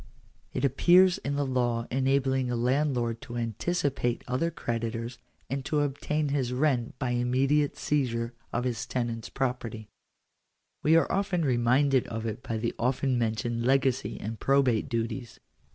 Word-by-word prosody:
It 130 - -1
appears 175 +7 +5
in 140 0 -3
the 145 0 0
law 120 -3 0
enabling 130 0 +1
a 120 - 0
landlord 125 -2 0
to 120 - -7
anticipate 120 - -1
other 130 +7 0
creditors, 115 -4 -4 0.3
and 135 0 -3
to 150 0 +1
obtain 145 +1 -1
his 135 -3 0
rent 125 -3 0
by 125 -3 -1
immediate 130 +4 +1
seizure 120 -5 -1 0.2
of 120 - -1
his 120 -3 -2
tenant's 120 -3 -3
property. 120 -5 -3 0.9
We 155 +2 +4
are 165 - +5 0.3
re 140 -8 +2
minded 130 +2 +3
of 110 0 -4
it 110 -1 -4
by 115 - -3
the 115 +1 -2
often 130 +1 +1
mentioned 115 +1 -1
legacy 130 0 +1
and 110 +1 -5
probate 135 -5 +2
duties. 115 +1 -3
125 Hz, 145 wpm, -28 LUFS, 115-140 Hz, 0.9 s, appears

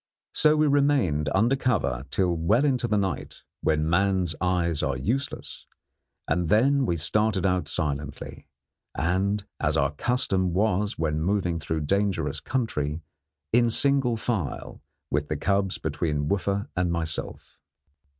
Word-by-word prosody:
So 155 0 +4
we 155 0 +3
remained 140 - +2
under 115 +7 +3
cover 80 - 0
till 90 -3 +1
well 105 - +2
into 130 -4 +1
the 105 -2 +1
night, 95 -3 -3 0.2
when 75 0 +1
man's 90 0 +1
eyes 90 -3 +1
are - - -1
useless, 130 +6 -3 0.6
and 85 +2 0
then 135 +4 +3
we 85 - 0
started 105 +4 +1
out 90 -4 +1
silently, 75 -3 -4 0.5
and, 95 +6 0
as 75 +1 +1
our 70 -1 +2
custom 95 - 0
was 105 +1 +1
when 75 -1 -1
moving 90 -1 0
through 80 0 -2
dangerous 100 +5 0
country, 80 - -2 0.5
in 120 0 +4
single 135 -1 +2
file, 110 - -3 0.3
with 75 +1 0
the 75 - -2
cubs 100 +3 +1
between 75 -3 -2
Wooffa 100 +2 -1
and 90 -1 0
myself. 80 -2 -4
95 Hz, 135 wpm, -26 LUFS, 80-110 Hz, 0.6 s, So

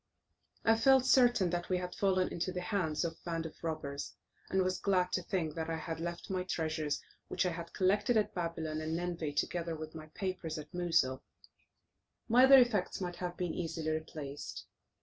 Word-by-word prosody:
I 225 0 +5
felt 265 +2 +5
certain 245 -9 +5
that 175 0 -2
we 185 - +2
had 180 0 -4
fallen 185 -2 +2
into 175 +2 -2
the 180 - -3
hands 180 -5 0
of 165 - -2
a - - -27
band 165 -1 -2
of 160 - -9
robbers, 150 -3 -4 0.3
and 190 0 +2
was 185 0 -1
glad 185 -2 +2
to 185 - 0
think 170 -3 -2
that 160 0 -3
I 165 - -1
had 160 0 -5
left 170 +2 -5
my 185 -1 0
treasures 160 -4 -2 0.2
which - - 0
I 180 - +1
had 170 0 -6
collected 205 +5 +2
at 210 - +1
Babylon 165 -3 -3
and 160 +1 -2
Nineveh, 170 -3 -2
together 165 +2 -1
with 155 0 -7
my 155 -1 -9
papers, 180 -2 -4
at 150 -1 -9
Mosul; 165 -7 +1 1.1
my 245 +3 +7
other 270 0 +9
effects 240 -7 +3
might 180 -2 -4
have 180 -1 -4
been 180 -2 -2
easily 160 -2 -2
replaced. 150 -2 -5
175 Hz, 190 wpm, -33 LUFS, 160-185 Hz, 1.1 s, other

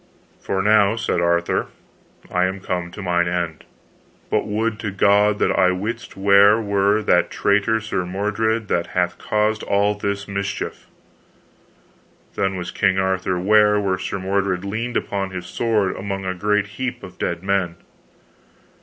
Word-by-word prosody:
For 95 0 -2
now, 105 0 +4
said 115 -6 -1
Arthur, 85 0 +1 0.6
I 90 0 +2
am 95 +1 -3
come 90 -2 -3
to 100 +3 -9
mine 85 -1 +1
end. 85 -2 -3 0.7
But - - +1
would 110 +1 -1
to 105 - -3
God 100 +2 +3
that - - +1
I 90 - +3
wist 105 +6 -4
where 100 +2 +5
were 100 0 +1
that - - +3
traitor 105 +2 +1
Sir 105 -4 -2
Mordred, 105 +4 -1
that 85 -2 0
hath 90 -1 0
caused 105 0 0
all 100 +1 +1
this 100 -1 -3
mischief. 100 -1 -4 1.5
Then 95 0 -1
was 90 -1 -5
King 95 -1 +1
Arthur 95 -1 0
ware 105 +2 +4
where 95 -2 -1
Sir - - -3
Mordred 95 -1 -1
leaned 115 +4 -2
upon 100 -1 -2
his 90 -2 -6
sword 110 -5 0
among 95 0 -4
a 95 - -1
great 105 +2 +1 0.2
heap 125 -3 -3
of 95 - -11
dead 85 +1 -2
men. 95 -3 0
100 Hz, 155 wpm, -21 LUFS, 95-105 Hz, 1.5 s, where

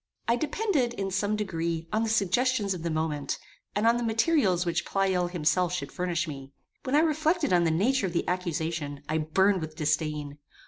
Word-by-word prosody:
I 235 - +4
depended, 295 - 0
in 195 -1 -3
some 205 +2 0
degree, 165 -5 -2
on 215 - +2
the 225 - 0
suggestions 220 +1 +2
of 180 - -6
the 170 - -2
moment, 155 -3 -2 0.4
and 205 +2 +1
on 230 +1 +5
the 240 - -2
materials 225 - +2
which 170 - 0
Pleyel 190 -2 +1
himself 175 +1 +1
should 140 -5 -3
furnish 175 -1 -1
me. 135 -2 -8 0.3
When 260 - 0
I 300 - +6
reflected 310 - +1
on 175 -1 +4
the - - +3
nature 200 +7 +2
of 175 - -6
the 170 - -1
accusation, 160 -5 -2
I 155 +1 0
burned 190 +5 +2
with 155 -1 -6
disdain. 150 -2 -1
180 Hz, 190 wpm, -28 LUFS, 160-225 Hz, 0.4 s, I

